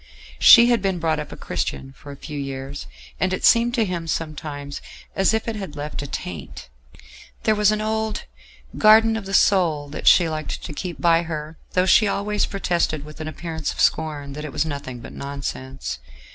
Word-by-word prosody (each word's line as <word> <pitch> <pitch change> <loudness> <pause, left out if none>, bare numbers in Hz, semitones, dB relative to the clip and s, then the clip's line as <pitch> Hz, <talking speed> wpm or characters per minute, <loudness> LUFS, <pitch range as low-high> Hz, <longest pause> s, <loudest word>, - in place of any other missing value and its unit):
She 235 +1 +9
had 235 -4 +2
been 190 -2 0
brought 160 -2 0
up 150 - -6
a - - -8
Christian 135 - -4
for 145 +1 -12
a - - -8
few 150 +1 -7
years, 135 0 -6 0.3
and 185 +2 +1
it 185 - -1
seemed 235 +1 +4
to 230 -3 +2
him 175 -3 -4
sometimes 150 -3 -4 0.3
as 195 +1 +3
if 220 +1 -1
it 230 - -2
had 195 -8 -6
left 145 0 -5
a 145 - -5
taint. 65 - -7 0.7
There 220 - +3
was 210 -1 +3
an 215 0 -1
old 220 0 -2 0.6
"Garden 220 +1 +6
of 210 -3 -5
the 195 - -6
Soul" 160 -7 +3
that 145 - -6
she 175 -2 +7
liked 155 -1 -4
to - - -6
keep 175 +3 -6
by 170 -1 +4
her, 155 -1 -6
though 180 0 +3
she 210 +3 +5
always 205 +1 0
protested 170 -6 -1
with 150 +1 -10
an 155 - -5
appearance 160 -1 -4
of - - -10
scorn 145 -3 0
that 150 +2 -6
it 150 - -6
was 145 - 0
nothing 140 -5 -6
but - - -10
nonsense. 130 - -5
160 Hz, 200 wpm, -22 LUFS, 145-200 Hz, 0.7 s, She